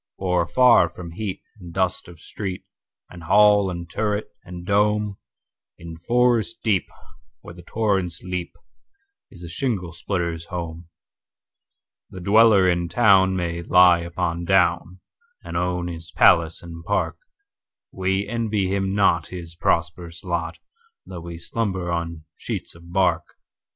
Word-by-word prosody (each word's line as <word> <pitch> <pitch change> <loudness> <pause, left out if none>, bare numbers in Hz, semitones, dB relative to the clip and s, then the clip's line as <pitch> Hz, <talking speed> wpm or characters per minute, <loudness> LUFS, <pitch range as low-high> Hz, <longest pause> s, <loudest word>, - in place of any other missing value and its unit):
For 90 -2 +1
afar 120 -6 +5
from 85 0 -9
heat 95 +2 -5 0.2
and 90 -3 -10
dust 95 0 -1
of 85 -2 -13
street, 95 +1 -6 0.5
And 85 -2 -11
hall 105 +1 +5
and 85 -1 -6
turret, 105 +4 -2
and 90 0 -9
dome, 105 0 +1 0.6
In 85 -1 -9
forest 120 +3 +1
deep, 105 -5 +1 0.5
where 85 - -11
the 90 - -12
torrents 95 -3 -1
leap, 90 -1 -5 0.7
Is 90 -2 -14
the - - -7
shingle 90 -1 -3
splitter's 85 -2 -3
home. 85 -1 -6 1.2
The 95 - -9
dweller 100 0 +5
in 85 -1 0
town 95 -5 +4
may 85 -2 -2
lie 90 0 +5
upon 85 0 -3
down, 90 0 +1 0.4
And - - -8
own 90 0 -1
his 85 -1 -8
palace 85 -1 +3
and 85 -1 -9
park:We 100 - -4
envy 105 -4 -1
him 95 0 -1
not 90 -5 +2
his 85 -2 -8
prosperous 85 +1 -2
lot, 85 -2 -3 0.5
Though 90 -2 -8
we 85 0 -8
slumber 95 -1 -3
on 85 -2 -4
sheets - - -5
of 85 +1 -15
bark. 90 -3 0
90 Hz, 135 wpm, -23 LUFS, 85-100 Hz, 1.2 s, afar